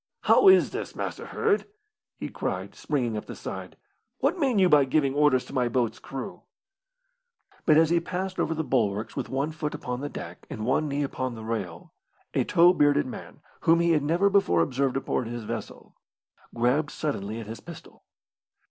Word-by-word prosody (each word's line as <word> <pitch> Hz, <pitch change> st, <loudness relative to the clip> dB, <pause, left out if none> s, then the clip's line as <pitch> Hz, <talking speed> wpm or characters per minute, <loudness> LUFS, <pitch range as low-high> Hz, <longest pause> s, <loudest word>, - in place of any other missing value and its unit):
"How 400 Hz, -, +5 dB
is 380 Hz, 0 st, +7 dB
this, -, -, -5 dB
Master -, -, -5 dB
Hird?" 435 Hz, -2 st, 0 dB, 0.5 s
he -, -, -5 dB
cried, -, -, -4 dB
springing 125 Hz, -7 st, -2 dB
up 105 Hz, -, -4 dB
the -, -, -7 dB
side. -, -, -7 dB, 0.4 s
"What 375 Hz, -, 0 dB
mean 265 Hz, -7 st, +2 dB
you 190 Hz, -2 st, +5 dB
by 150 Hz, -4 st, +6 dB
giving 135 Hz, 0 st, +1 dB
orders 145 Hz, -3 st, +3 dB
to -, -, -12 dB
my 125 Hz, -3 st, +1 dB
boat's 120 Hz, -1 st, 0 dB
crew?" 135 Hz, -1 st, -7 dB, 1.3 s
But 155 Hz, -2 st, +6 dB
as 160 Hz, 0 st, +4 dB
he 170 Hz, -, +4 dB
passed 185 Hz, +2 st, -4 dB
over 160 Hz, -, 0 dB
the 160 Hz, -, -1 dB
bulwarks, 110 Hz, -6 st, 0 dB
with -, -, -4 dB
one 140 Hz, +4 st, -1 dB
foot 155 Hz, -1 st, -4 dB
upon 125 Hz, +1 st, -4 dB
the 145 Hz, -, -3 dB
deck 85 Hz, -8 st, -9 dB
and 110 Hz, -, -5 dB
one 135 Hz, +5 st, +1 dB
knee 145 Hz, 0 st, -1 dB
upon 130 Hz, -3 st, -3 dB
the 110 Hz, -, -8 dB
rail, 100 Hz, -7 st, -5 dB, 0.4 s
a -, -, +2 dB
tow 175 Hz, +2 st, +5 dB
bearded 145 Hz, -3 st, +3 dB
man, 130 Hz, -, -9 dB, 0.2 s
whom 165 Hz, +1 st, +4 dB
he 170 Hz, 0 st, +3 dB
had 155 Hz, -2 st, +3 dB
never 170 Hz, +7 st, +2 dB
before 195 Hz, -, +3 dB
observed 135 Hz, +5 st, 0 dB
aboard 130 Hz, -2 st, -2 dB
his 120 Hz, 0 st, -5 dB
vessel, -, -, -7 dB, 0.6 s
grabbed 125 Hz, +6 st, +1 dB
suddenly 110 Hz, -9 st, -3 dB
at 115 Hz, -, -7 dB
his 110 Hz, +2 st, -7 dB
pistol. 170 Hz, -2 st, -12 dB
140 Hz, 185 wpm, -26 LUFS, 120-165 Hz, 1.3 s, is